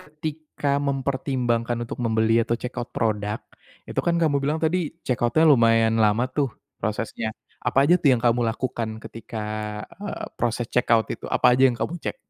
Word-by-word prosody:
ketika 150 -2 -3
mempertimbangkan 130 -3 -1
untuk 120 - -7
membeli 110 0 +3
atau 115 - 0
check 125 - -5
out 120 - -4
produk, 105 -1 -1 0.5
itu - - -1
kan 170 - +3
kamu 150 -3 +2
bilang 150 +3 0
tadi 175 +4 +2 0.3
check 125 -2 0
out-nya 140 +7 +3
lumayan 115 -4 +5
lama 110 +4 +3
tuh, 140 -3 +2 0.3
prosesnya. 110 +1 -2 0.4
Apa 135 +1 +3
aja 175 - +7
tuh 145 - +3
yang 120 - +2
kamu 120 +1 +3
lakukan 115 0 -2 0.2
ketika, 115 -1 -7 0.6
eee, 205 - -5
proses 120 0 -1
check 125 - 0
out 110 -1 +4
itu? - - -6
Apa 125 - +4
aja 130 - +2
yang 120 - -2
kamu 175 - -2
cek? - - -3
120 Hz, 175 wpm, -24 LUFS, 115-140 Hz, 0.6 s, aja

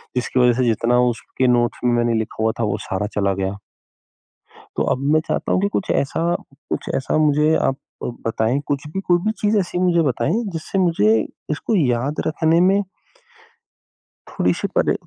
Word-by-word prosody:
जिसकी 125 +1 0
वज़ह 125 -1 +5
से - - +2
जितना 115 +2 +2
उसके 125 +2 -2
नोट्स 120 -1 +2
में 120 - +3
मैंने 120 0 +1
लिखा 110 0 -4
हुआ 110 - +3
था - - +1
वो 105 - -1
सारा 95 +2 -2
चला 100 -1 +2
गया। 95 +1 -3 1.2
तो - - +1
अब - - -6
मैं 155 - +4
चाहता - - -1
हूँ - - +2
कि 200 - +2
कुछ 190 - -2
ऐसा, 165 +5 0 0.3
कुछ - - -3
ऐसा 135 - -1
मुझे 150 +1 +3
आप 135 - +1 0.5
बताएँ 115 +4 0
कुछ 145 0 -2
भी 190 +6 -4
कोई 175 -2 +2
भी 215 - +1
चीज़ 210 +1 +2
ऐसी 180 -2 -2
मुझे 175 -2 +3
बताएँ 160 - 0
जिससे 165 +4 -3
मुझे 135 - +3 0.3
इसको 155 +9 -1
याद 135 -2 0
रखने 160 +1 +2
में 195 +3 +4 1.5
थोड़ी-सी - - 0
परे - - +3
140 Hz, 175 wpm, -21 LUFS, 120-175 Hz, 1.5 s, वज़ह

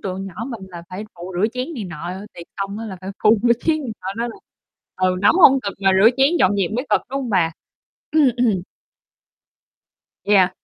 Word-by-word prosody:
tụi 190 -1 -4
nhỏ 195 -2 -7
mình 230 -5 -6
là 170 -1 -9
phải 190 +3 -6
phụ 175 +2 -8
rửa 195 +4 +3
chén 255 +6 -4
này 230 -7 -5
nọ, 175 -1 -6 0.2
tiệc 170 - -10
xong 200 +1 -4
á 225 - -5
là 190 -3 -7
phải 190 +1 -6
phụ 215 +1 +5
rửa 235 - +5
chén, 315 -1 +1 0.2
ờ, 190 - -4
nên 235 +1 -1
là - - -11 0.6
ừ, 185 0 +1
nấu 205 - +6
hông 270 -5 +7
cực 200 -4 -4
mà 195 -1 +4
rửa 225 - +8
chén 270 +1 +5
dọn 200 +2 +3
dẹp 190 -3 0
mới 250 +4 -2
cực, - - +4
đúng 275 +1 -2
hông 250 -3 -4
bà? 170 -5 +2 0.6
Ừm, 300 -4 +5
ừm. 225 -7 +1 1.6
Yeah. 195 -3 +4
200 Hz, 215 wpm, -21 LUFS, 185-245 Hz, 1.6 s, rửa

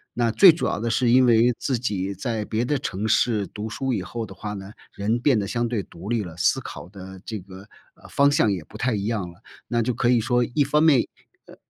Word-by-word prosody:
那 120 -1 +1
最 185 - +8
主 165 - -3
要 - - -1
的 115 - -2
是 120 +2 +1
因 130 +2 +5
为 120 0 +4
自 130 -5 -2
己 100 -5 -2
在 110 +3 -3
别 110 +3 -2
的 145 +3 0
城 105 -4 -3
市， 110 -2 +2
读 105 +1 -6
书 130 +4 -2
以 100 - -2
后 115 +4 -5
的 95 -2 -12
话 105 +3 -6
呢， 100 +1 -8 0.2
人 110 +4 -1
变 125 -2 +3
得 100 - -3
相 120 +3 -1
对 115 -4 -1
独 85 +3 -10
立 120 -2 +1
了， 85 -5 -8
思 85 -1 +2
考 90 - -9
的 95 -1 -11
这 110 -2 -5
个， 95 +2 -13 0.3
呃， - - -16
方 140 0 +3
向 145 -7 +2
也 95 -4 -2
不 105 - -12
太 125 +2 0
一 100 -1 -2
样 105 -6 -2
了。 85 - -21 0.3
那 120 0 +1
就 120 +2 -1
可 120 - 0
以 125 -1 +4
说 120 +2 +1
一 120 +5 0
方 150 +3 +2
面， 145 -7 +4 0.4
呃， - - -14
110 Hz, 270 characters per minute, -23 LUFS, 100-120 Hz, 0.4 s, 最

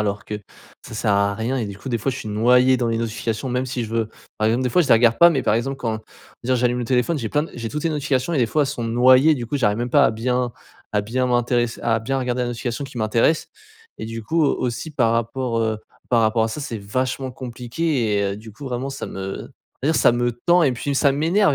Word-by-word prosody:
alors 105 0 -2
que 105 0 -5 0.4
ça - - -10
sert 110 0 0
à 100 0 +2
rien 120 +5 -2
et 115 - -2
du 100 -1 -7
coup, 135 - -8
des 115 - 0
fois, 135 - -1
je 130 - -5
suis 110 - -6
noyé 125 +4 +4
dans 120 - 0
les 115 - 0
notifications, 115 +1 -3
même 125 +1 -1
si, 125 -2 -3
je 110 - -9
veux 115 -1 0 0.3
par 110 0 +2
exemple, 120 +3 +1
des 125 - 0
fois, 180 - +4
je - - -2
les - - +7
regarde 115 0 +4
pas, 170 - +9
mais 140 -5 0
par 105 - +2
exemple, 135 +4 -1
quand 115 -4 -2
je - - -13 0.5
veux 130 - +4
dire, - - +2
j'allume 125 0 +1
le 120 - -2
téléphone, 130 +6 +1
j'ai 115 -4 -3
plein 150 - +1
d - - -12
j'ai 115 -2 -4
toutes 150 +4 -5
les 165 - +2
notifications 145 +1 -1
et, 150 - +1
des 120 - +3
fois, 150 +6 +1
elles - - 0
sont 135 -4 -4
noyées, 130 +6 +5
du 120 -4 -5
coup, 145 - -2
j'arrive 105 -3 +1
même 120 0 -2
pas 140 0 +5
à - - +2
bien 125 +2 -1 0.4
à 105 - +2
bien 125 +4 -1
m'intéresser 120 -1 0
à 115 -1 +2
bien 135 +4 -1
regarder 125 -1 -1
la 120 - -1
notification 120 +2 -4
qui 135 -3 -8
m'intéresse 115 +8 +1 0.5
et, - - -5
du 115 0 -6
coup 160 +8 +1
au 140 - +2
aussi, 125 +6 -3
par 120 -6 +2
rapport, 115 +1 -1
heu 110 -1 0 0.3
par 120 -2 +4
rapport 110 0 +2
à 115 - -1
ça, 130 - -5
c'est 130 -5 -4
vachement 130 +5 -2
compliqué 125 -1 -2
et, - - +1
heu, - - -6
du 110 0 -11
coup, 140 - -11
vraiment, 130 +1 -3
ça 135 - -6
me 95 0 -6 0.3
on - - +2
va 160 - +4
dire, - - 0
ça - - +5
me 120 0 +1 0.2
tend 175 0 +5
et 140 - +4
puis 140 +4 -3
ça 140 +1 +4
m'énerve 160 +4 +2
120 Hz, 280 wpm, -22 LUFS, 115-135 Hz, 0.5 s, pas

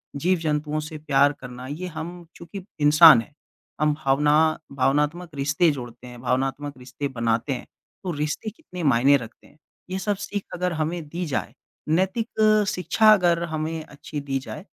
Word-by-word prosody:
जीव-जंतुओं 155 -2 0
से 155 +1 -7
प्यार 145 -2 +3
करना 125 0 -9
ये 160 +7 -5
हम 165 +1 -5 0.2
चूँकि 175 +3 -9 0.2
इंसान 150 -3 +8
है, 150 - -14 0.5
हम 150 0 +3
भावना 140 +2 +3 0.4
भावनात्मक 150 +6 0
रिश्ते 150 +5 +2
जोड़ते 120 0 -9
हैं, 120 -1 -11
भावनात्मक 135 +3 -1
रिश्ते 130 +3 -5
बनाते 115 +1 -1
हैं, 125 - -6 0.4
तो 185 - -2
रिश्ते 150 +8 -2
कितने 210 - -9
मायने 135 0 +5
रखते 115 -3 -12
हैं। - - -24 0.3
ये 190 +1 -3
सब 205 +2 -1
सीख 205 -1 -4
अगर 180 0 -1
हमें 160 +2 -2
दी 175 +3 -4
जाए, 145 -5 -3 0.4
नैतिक 215 +4 +2
शिक्षा 215 +4 +3
अगर 175 -4 +2
हमें 160 +1 -3
अच्छी 150 0 -8
दी 135 -1 -2
जाए 135 - -8
150 Hz, 160 wpm, -24 LUFS, 135-175 Hz, 0.5 s, इंसान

